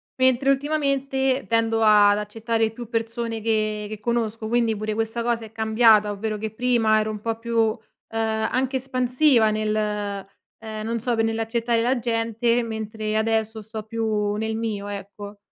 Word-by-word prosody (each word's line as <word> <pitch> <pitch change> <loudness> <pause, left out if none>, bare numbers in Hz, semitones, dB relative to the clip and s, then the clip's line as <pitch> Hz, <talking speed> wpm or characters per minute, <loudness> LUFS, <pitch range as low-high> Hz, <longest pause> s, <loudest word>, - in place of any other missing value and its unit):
Mentre 260 +1 +3
ultimamente 275 -2 0
tendo 225 -1 +1
ad 205 -1 +6
accettare 225 +2 -1
più 235 0 -9
persone 230 -1 -3
che 215 -1 0
che 215 -1 -6
conosco. 225 -1 -2
Quindi 230 -1 +1
pure 215 +1 -3
questa 225 +2 -2
cosa 230 -1 -1
è 215 - -13
cambiata 220 -1 +4
ovvero 215 +1 -3
che 220 +1 -4
prima 225 -2 +2
ero 215 0 -1
un 210 -1 -7
po' 225 0 -2
più, 230 0 -3
uhm, 225 +1 +2 0.3
anche 225 +4 0
espansiva 255 -1 +3
nel 215 0 -1
ehm 210 +1 -5
non 230 +1 -2
so 240 +1 0
p - - -4
nell'accettare 225 +1 0
la 245 +2 +1
gente, 230 0 0
mentre 220 -1 -4
adesso 220 0 0
sto 220 +1 -7
più 215 -2 -1
nel 220 +1 -2
mio, 210 -3 -3
ecco. 205 +1 -8
225 Hz, 160 wpm, -23 LUFS, 215-235 Hz, 0.3 s, ad